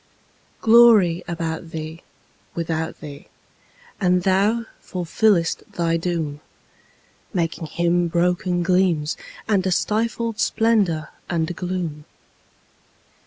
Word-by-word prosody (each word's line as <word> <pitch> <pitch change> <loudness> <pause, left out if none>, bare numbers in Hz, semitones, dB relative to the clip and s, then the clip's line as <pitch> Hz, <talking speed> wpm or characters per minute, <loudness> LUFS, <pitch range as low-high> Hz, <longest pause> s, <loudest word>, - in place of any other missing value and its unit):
Glory 220 -7 +6
about 165 -1 -4
thee, 160 +1 -6 0.5
without 160 -1 -3
thee; 145 -2 -10 0.7
and 180 -2 +2
thou 205 +5 +2 0.2
fulfillest 180 0 +1
thy 165 -1 0
doom, 165 -4 -2 1.0
Making 165 -2 -1
Him 175 +2 +1
broken 175 +1 0
gleams, 175 -4 +2 0.3
and 200 -4 +2
a - - +1
stifled 225 +3 -1
splendour 205 -9 +1 0.2
and 170 0 -1
gloom. 175 -5 -4
175 Hz, 90 wpm, -22 LUFS, 165-190 Hz, 1.0 s, Glory